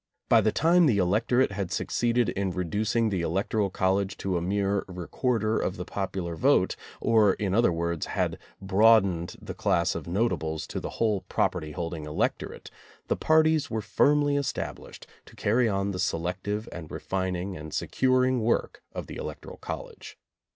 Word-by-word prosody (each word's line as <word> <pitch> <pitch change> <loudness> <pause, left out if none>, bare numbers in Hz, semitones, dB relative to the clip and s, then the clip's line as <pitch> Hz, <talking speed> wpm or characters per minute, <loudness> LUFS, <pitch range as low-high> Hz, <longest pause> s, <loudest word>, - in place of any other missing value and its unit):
By 115 - +6
the 110 0 +2
time 170 +5 +4
the 115 -7 +3
electorate 110 +7 +2
had 100 -3 -3
succeeded 120 +2 +1
in 100 +1 -1
reducing 105 +6 0
the 95 -4 -1
electoral 100 +5 0
college 95 +1 0
to 95 -2 -2
a 85 - 0
mere 100 +2 0
recorder 110 +5 -1
of 90 - -2
the 90 - -5
popular 95 -4 -3
vote, 80 - +3 0.2
or 110 -4 +4
in 100 -3 -2
other 115 -2 +4
words, 85 -1 -2
had - - -1 0.2
broadened 95 -3 +3
the - - -7
class 85 +1 +1
of - - -6
notables 85 -5 -1
to - - -5
the - - -5
whole 105 -4 +1
property 85 -5 -1
holding 85 0 -4
electorate, 75 0 -3 0.4
the - - +2
parties 160 -1 +3
were 110 -1 -2
firmly 145 +7 +2
established 140 -2 -4 0.2
to - - -15
carry 115 +3 +2
on 100 0 0
the 90 - -5
selective 90 +5 -2
and 80 -3 -8
re - - -5
fining 95 0 -2
and 75 -1 -8
securing 130 - +2
work 115 +2 0
of - - -5
the - - -8
electoral - - -7
college. - - -8
100 Hz, 165 wpm, -27 LUFS, 90-115 Hz, 0.4 s, By